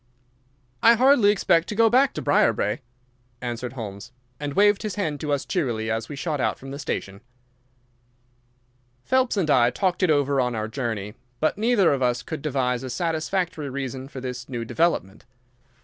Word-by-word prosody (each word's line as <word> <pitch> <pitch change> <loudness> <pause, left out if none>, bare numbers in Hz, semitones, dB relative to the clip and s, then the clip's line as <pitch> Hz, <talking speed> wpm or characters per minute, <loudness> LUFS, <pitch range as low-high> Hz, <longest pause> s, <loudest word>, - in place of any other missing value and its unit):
"I 230 - +7
hardly 250 -3 +5
expect 170 -4 +2
to 210 - -3
go 225 +1 +5
back 260 +4 +3
to - - -4
Briarbrae," - - +2 0.6
answered 120 0 -5
Holmes, 110 -1 -7 0.3
and 145 -1 -4
waved 205 0 +4
his 210 -4 -4
hand 155 -8 -2
to 150 -2 -3
us 140 -2 0
cheerily 115 -10 -1
as 115 0 -3
we 145 - -6
shot 150 -1 -2
out - - 0
from 135 +1 -10
the 140 - -6
station. 100 -8 -4 1.8
Phelps 260 -3 +2
and 165 -6 +1
I 120 -3 +5
talked 180 +8 -1
it 185 - +3
over 140 -2 +2
on 125 -1 -1
our 110 0 -2
journey, 110 -4 -4 0.3
but 155 - +1
neither 210 -6 +3
of 135 - -2
us 125 -1 +1
could 160 - -6
devise 130 -4 -1
a 130 - -6
satisfactory 165 +2 -2
reason 135 -1 -5
for 135 - -8
this 125 -1 -6
new 120 -3 -4
development. 140 - 0
140 Hz, 175 wpm, -24 LUFS, 125-180 Hz, 1.8 s, I